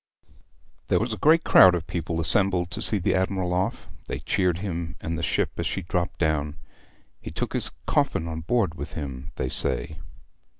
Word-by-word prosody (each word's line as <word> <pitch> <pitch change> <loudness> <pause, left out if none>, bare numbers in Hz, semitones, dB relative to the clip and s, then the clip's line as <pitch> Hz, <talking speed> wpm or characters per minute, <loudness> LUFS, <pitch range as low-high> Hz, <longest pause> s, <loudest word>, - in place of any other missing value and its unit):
There - - +2
was 115 +1 -2
a - - -5
great 160 +2 +4
crowd 90 -1 +7
of 85 - -4
people 85 -2 -3
assembled 90 +1 +4
to 110 - -4
see 110 - +6
the 90 - 0
admiral 95 -1 -1
off; 90 +1 -2 0.2
they - - -3
cheered 90 -3 0
him 85 -4 -4
and 80 - -4
the 85 - -4
ship - - 0
as - - -2
she 95 - -3
dropped 85 +1 -2
down. 75 -2 0 0.7
He - - -7
took - - -4
his - - 0 0.2
coffin 80 - 0
on 80 -1 -5
board 100 -1 0
with 70 -1 -8
him, 70 -5 -6
they 65 - -2
say.' 75 +5 -3
85 Hz, 185 wpm, -25 LUFS, 80-95 Hz, 0.7 s, crowd